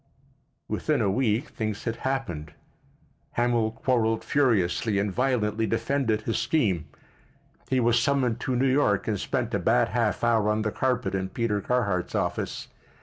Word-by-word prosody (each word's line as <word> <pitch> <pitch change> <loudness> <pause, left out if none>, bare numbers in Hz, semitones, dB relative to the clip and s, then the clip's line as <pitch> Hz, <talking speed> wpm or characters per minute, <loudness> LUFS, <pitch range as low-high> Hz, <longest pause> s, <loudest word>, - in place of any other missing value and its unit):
Within 150 -3 0
a 100 -4 +2
week 115 +1 0
things 110 -2 -4
had 115 -1 -3
happened. 130 - -3 0.8
Hamil 120 -2 +1
quarrelled 115 -1 0
furiously 110 -6 +1
and 100 0 0
violently 115 -2 0
defended 115 0 0
his 115 +1 -1
scheme. 95 - 0 0.8
He 130 - +2
was 120 0 +3
summoned 125 -3 +1
to 130 - -1
New 125 +2 +2
York 130 -8 +2
and 105 -3 0
spent - - -2
a - - +1
bad - - +2
half - - 0
hour 115 -3 +3
on 105 0 +1
the 110 - -1
carpet 125 -7 -1
in 95 -1 -2
Peter 105 -1 -1
Carhart's 100 -7 -1
office. - - -2
115 Hz, 150 wpm, -26 LUFS, 105-125 Hz, 0.8 s, was